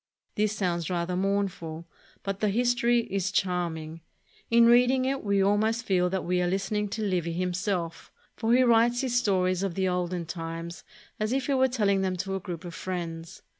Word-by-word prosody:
This 210 0 +1
sounds 175 -5 -1
rather 180 0 -1
mournful, 185 -4 -2 0.4
but 195 0 -3
the 210 - +1
history 240 +2 +2
is 195 -1 0
charming. 165 -4 -2 0.5
In 235 0 +6
reading 250 +2 +5
it 270 +1 -1
we 200 -1 +2
almost 215 +3 +1
feel 180 -2 +2
that 190 0 -2
we 180 +1 +1
are 175 - +1
lis 195 +3 -2
tening 210 -1 0
to 220 - -3
Livy 175 -4 -1
himself, 180 -1 -2 0.2
for 225 0 -1
he 255 +2 +5
writes 240 0 +4
his 255 -3 -1
stories 185 -5 +2
of 195 -4 -2
the 190 -1 +1
olden 180 -1 -1
times 165 0 -6 0.4
as 215 +1 -1
if 270 -1 0
he 280 - 0
were 260 0 +4
telling 205 -6 +1
them 190 -1 0
to 195 +2 -3
a 195 - -1
group 175 -2 -7
of 175 - -7
friends. 170 -3 -6
195 Hz, 190 wpm, -27 LUFS, 175-220 Hz, 0.5 s, In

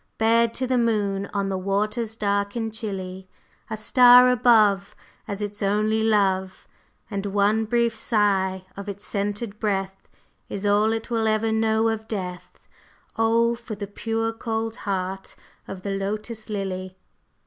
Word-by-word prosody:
Bared 230 +1 +3
to 260 - -1
the 255 -1 +1
moon 205 -4 0
on 200 -1 -1
the 190 -1 -2
waters 210 +4 -1
dark 200 -1 -1
and 225 -2 -3
chilly. 190 -4 -5 0.4
A 220 - -3
star 250 +3 +7
above 215 -5 +3 0.3
Is 205 -1 -4
its 205 0 -5
only 210 +2 +1
love, 195 -4 +1 0.4
And 200 0 -3
one 205 +2 +2
brief 235 0 +1
sigh 190 -4 +1
of 200 +1 -7
its 200 0 -7
scented 205 +1 -3
breath 195 -2 -2 0.4
Is 200 +1 -5
all 205 +2 +3
it 225 +2 -4
will 225 -1 +1
ever 220 +1 +1
know 220 0 +2
of 220 0 -3
Death; 180 -5 -6 0.6
Oh, 230 +1 +3
for 235 -2 -7
the 205 0 -5
pure 225 +2 -2
cold 225 0 -3
heart 195 -1 -4 0.3
of 185 -1 -8
the 200 - -3
Lotus 215 +3 -4
Lily!" 185 -2 -4
210 Hz, 150 wpm, -24 LUFS, 195-225 Hz, 0.6 s, star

